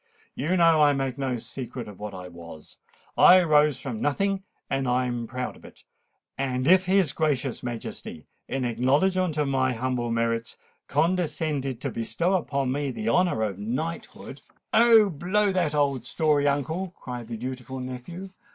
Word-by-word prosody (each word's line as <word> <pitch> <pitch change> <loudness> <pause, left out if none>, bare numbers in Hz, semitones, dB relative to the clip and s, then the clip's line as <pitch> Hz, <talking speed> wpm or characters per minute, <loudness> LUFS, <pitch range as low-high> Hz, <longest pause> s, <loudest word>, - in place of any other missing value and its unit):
You 180 +5 0
know 165 -2 +5
I 145 -1 +5
make 135 -1 -2
no 130 -3 -1
secret 125 0 -6
of 105 -3 -11
what 105 -2 -6
I 90 -1 -8
was. 85 -3 -12 0.4
I 185 0 +7
rose 150 -3 +3
from 120 -6 -5
nothing—and 145 -5 -2
I'm 125 -1 0
proud 125 +1 -4
of - - -18
it. - - -15 0.6
And 130 -1 -1
if 185 +1 +6
his 185 -5 +2
gracious 140 -5 -1
Majesty, 120 -2 -7 0.2
in 135 -1 -2
acknowledgment 150 +9 +1
of 150 -1 +1
my 130 -1 +1
humble 125 0 -2
merits, 115 0 -1 0.3
condescended 155 -7 0
to 140 - -2
bestow 165 +12 -1
upon 140 -7 0
me 140 +1 -1
the 215 - -3
honour 175 -12 +2
of 100 -3 -3
knighthood——" 130 +11 -5 0.3
"Oh! 225 -2 +7
blow 190 +6 +1
that 170 -5 0
old 140 -4 0
story, 150 +1 +2
uncle!" 160 +6 -1
cried 125 -2 -7
the 115 - -5
dutiful 130 +1 -6
nephew. 130 +10 -7
135 Hz, 155 wpm, -26 LUFS, 125-165 Hz, 0.6 s, I